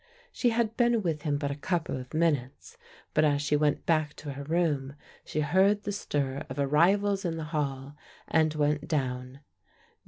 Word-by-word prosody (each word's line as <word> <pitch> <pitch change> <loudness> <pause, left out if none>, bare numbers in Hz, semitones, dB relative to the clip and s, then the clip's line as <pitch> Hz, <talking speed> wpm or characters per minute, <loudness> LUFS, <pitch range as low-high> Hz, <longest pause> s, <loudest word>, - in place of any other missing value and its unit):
She 245 - +1
had 230 -1 0
been 235 -3 +2
with 160 -4 -1
him 150 -3 0
but 145 -1 -2
a - - -3
couple 165 +2 -2
of 130 -1 -7
minutes, 155 - -1 0.4
but 155 - +3
as 145 -2 +3
she 150 0 +1
went 150 0 +1
back 155 -2 +1
to 145 - -7
her 140 +1 -7
room, 145 -4 0 0.3
she 155 - -2
heard 190 +7 +3
the 205 - -2
stir 145 -7 -2
of 130 - -6
arrivals 190 +8 +3
in 165 -3 -2
the 160 - -4
hall, 140 -2 -2 0.3
and 160 -1 +3
went 150 0 0
down. 130 -3 -2
150 Hz, 180 wpm, -28 LUFS, 140-175 Hz, 0.4 s, but